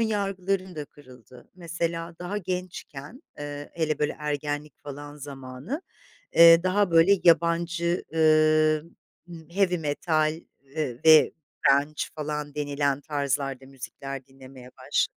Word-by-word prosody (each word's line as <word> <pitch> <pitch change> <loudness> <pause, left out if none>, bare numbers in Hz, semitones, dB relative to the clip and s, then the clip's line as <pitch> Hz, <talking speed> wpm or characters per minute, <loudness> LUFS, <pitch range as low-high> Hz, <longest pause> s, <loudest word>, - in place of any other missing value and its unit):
yargılarım 195 -4 -1
da 150 - -5
kırıldı. 130 -3 -17
Mesela 170 -1 -4
daha 180 +4 -3
gençken, 180 - -6 0.2
ııı, 145 0 -6
hele 160 -2 -1
böyle 150 0 0
ergenlik 150 0 -4
falan 145 0 -8
zamanı, 140 - -7 0.5
eee, 165 0 +8
daha, 185 +1 +2
böyle, 165 +4 +6
yabancı, 170 +1 +2
ııı, 155 -1 +4 0.4
ımm, 165 -2 -11
heavy 180 -1 +1
metal, 155 +1 0 0.4
ııı, 130 -6 -2
ve 160 -1 +7 0.4
grunge 145 +2 +2
falan 150 -1 -4
denilen 145 -1 -1
tarzlarda 140 -2 -2
müzikler 135 0 -8
dinlemeye 130 -1 -14
başladım. - - -1
155 Hz, 115 wpm, -26 LUFS, 145-170 Hz, 0.5 s, eee